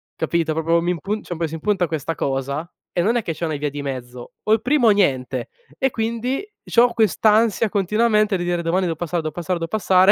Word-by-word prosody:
capito?" 165 -2 0
Proprio, 165 +1 +2
mi 175 +1 0
impun 195 +5 -3
cioè, - - -5
un 165 - -8
pò 165 - 0
si 155 - -10
impunta 180 +2 0
questa 160 0 -3
cosa, 140 +4 -2 0.2
e 175 - 0
non 220 +7 +2
è 240 - +2
che 165 - -2
c'è 170 - -4
una 155 -2 -2
via 145 +1 -2
di 145 +1 -6
mezzo: 125 -3 -6
o 215 - -1
il 220 - +2
primo 255 -3 +3
o - - +8
niente. 130 - +1 0.3
E 265 - +1
quindi 235 - -2 0.2
c'ho 240 +1 +5
quest'ansia 220 0 +3
continuamente 210 +1 +2
di 175 - -3
dire: 175 -1 0
"domani 175 +3 +1
devo 170 -2 -1
passare, 175 0 -2
devo 155 -1 -4
passare, 175 +1 -2
devo 165 - -4
passare," 190 -2 +5
175 Hz, 230 wpm, -21 LUFS, 160-215 Hz, 0.3 s, o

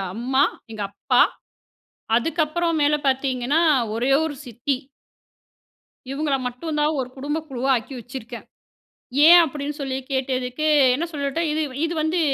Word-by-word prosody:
அம்மா, 260 +4 +2 0.3
எங்க 215 -2 -4
அப்பா, - - +2 1.0
அதுக்கப்புறம் 325 +5 0
மேல 300 +1 +3
பாத்தீங்கன்னா 265 +2 +1 0.3
ஒரே 245 +4 0
ஒரு 305 -2 -3
சித்தி. 245 +4 -2 1.3
இவுங்கள 280 0 0
மட்டும் 300 +6 -4
தான் 300 0 +1
ஒரு 255 - -4
குடும்ப 290 +3 -2
குழுவாக்கி 260 -1 -1
வச்சிருக்கேன். 240 -1 -9 0.8
ஏன்? 345 +1 +10
அப்படின்னு 290 +1 -5
சொல்லி 265 -1 -2 0.2
கேட்டதுக்கு 255 +1 -2 0.3
என்ன 310 - -1
சொல்லிட்ட 285 +1 -2
இது 310 +1 -1 0.2
இது 330 - -1
வந்து 325 +3 0
275 Hz, 120 wpm, -23 LUFS, 255-305 Hz, 1.3 s, ஏன்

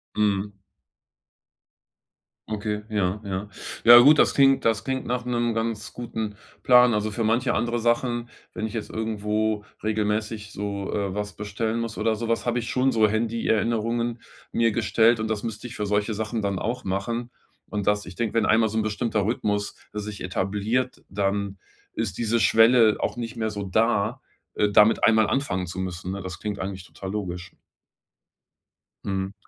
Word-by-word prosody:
Mhm. 100 -1 0 1.9
Okay. 105 0 -2
Ja, 100 -2 0
ja, 100 +1 -4 0.3
ja, 120 +1 +10
gut, 145 +5 +7
das - - +4
klingt 135 -1 +4
das 115 -1 +1
klingt 130 -1 -2
nach 125 0 -2
'nem 120 -1 0
ganz 115 -1 -3
guten 110 -3 -5 0.3
Plan. 125 -1 +6
Also, 105 0 0
für 110 +2 -2
manche 120 +3 +2
andere 120 +1 0
Sachen, 120 0 0 0.2
wenn 110 - -3
ich 110 - -4
jetzt 110 -3 -4
irgendwo 110 -1 -1 0.2
regelmäßig 105 0 -2
so, 100 -1 -4
äh, 100 -2 -1
was 105 -1 -4
bestellen 110 +2 -2
muss 115 -1 -5
oder 110 -1 +1
so 115 +1 -4
was 115 - 0
habe 120 0 +1
ich 120 - -5
schon 130 +1 +2
so 110 -1 +4
Handy-Erinnerungen 115 +1 0 0.3
mir 115 -1 +3
gestellt. 115 +2 +3
Und 110 - -1
das 110 -2 -2
müsste 115 +1 -5
ich 125 - -10
für 105 - -2
solche 105 +2 0
Sachen 110 +2 -3
dann 100 -2 -1
auch 120 +6 -3
machen. 115 +6 -2 0.4
Und 105 -2 -3
das 105 0 +1
ich 90 - -10
denke, 115 -3 -2
wenn 115 -2 +3
einmal 110 0 +3
so 110 - -3
ein - - +3
bestimmter 110 -1 -1
Rhythmus 105 -2 -1 0.2
sich 105 -1 -6
etabliert, 105 +7 -1
dann 100 0 -1 0.4
ist - - -3
diese 115 0 +1
Schwelle 115 +1 +5
auch - - -2
nicht 115 -1 -5
mehr 110 -1 -1
so 105 -1 -5
da, 100 +2 +1 0.3
äh, 105 - +2
damit 105 +2 +5
einmal 110 -1 +5
anfangen 95 -10 -1
zu 90 +2 -6
müssen. 90 0 -4
Ne, 100 - -5
das 95 -2 -7
klingt 105 -1 -4
eigentlich 95 -1 -5
total 95 +2 -8
logisch. 90 -4 -5 1.5
Mhm, 95 0 -2
110 Hz, 170 wpm, -25 LUFS, 100-115 Hz, 1.9 s, ja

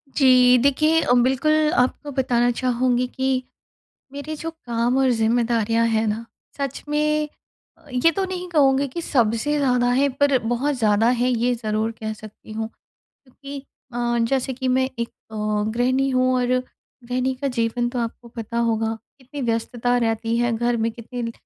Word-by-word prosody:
जी। 250 -2 +6
देखिए 305 +5 +3
अ, 245 - +2
बिल्कुल 305 +4 +2
आपको 285 +3 0
बताना 245 -2 +1
चाहूँगी 250 0 0
कि, 260 0 -1 0.7
मेरे 295 +2 -5
जो 325 +2 -5 0.2
काम 240 +2 0
और 265 -1 +3
ज़िम्मेदारियाँ 230 0 +1
हैं 220 0 +1
ना, 220 +2 -2 0.3
सच 275 -2 -4
में 300 0 +1 0.7
ये 290 +7 +4
तो 390 - 0
नहीं 365 -1 -5
कहूँगी 280 -3 +3
कि 335 +6 -5
सबसे 245 +2 +1
ज़्यादा 250 -3 +2
हैं 275 +2 +2
पर 285 -2 +4
बहुत 240 +6 -1
ज़्यादा 215 0 +3
हैं 250 - +2
ये 245 0 +1
ज़रूर 220 -1 -2
कह 220 0 -3
सकती 215 0 -13
हूँ। 220 0 -3 0.4
क्योंकि 275 +1 -11 0.3
अ, 240 0 0
जैसे 265 0 0
कि 260 0 -3
मैं 260 +1 +2
एक 235 - -2
अ, 220 - -18 0.4
गृहिणी 255 +3 +1
हूँ 255 0 +2
और 250 -1 +1 0.6
गृहिणी 255 +2 -1
का 275 +2 -3
जीवन 240 0 -1
तो 245 0 -4
आपको 235 +1 -5
पता 230 0 -5
होगा। 225 -1 0 0.2
कितनी 275 +2 -9
व्यस्तता 240 +1 0
रहती 225 0 0
है 240 0 +1
घर 240 +1 0
में 225 0 0
कितने 235 0 -6
245 Hz, 160 wpm, -22 LUFS, 230-270 Hz, 0.7 s, जी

